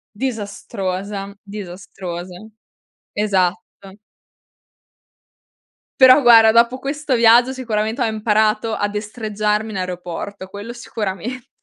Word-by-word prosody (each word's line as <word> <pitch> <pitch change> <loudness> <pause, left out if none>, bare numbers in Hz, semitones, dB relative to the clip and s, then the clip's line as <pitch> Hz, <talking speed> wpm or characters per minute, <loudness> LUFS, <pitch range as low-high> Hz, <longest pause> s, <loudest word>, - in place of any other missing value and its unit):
Disastrosa, 200 -4 -4
disastrosa, 185 -3 -7 0.9
esatto. 195 0 -2 2.0
Però 260 +2 +8
guarda, 225 -2 +7
dopo 235 +2 +3
questo 280 0 -2
viaggio 235 +2 +5
sicuramente 225 -2 -2
ho - - +2
imparato 215 0 +1
a 205 -1 -1
destreggiarmi 210 0 -2
in 195 - -4
aeroporto, 180 +2 -6
quello 205 +4 -8
sicuramente. 230 +1 -5
215 Hz, 90 wpm, -19 LUFS, 195-235 Hz, 2.0 s, Però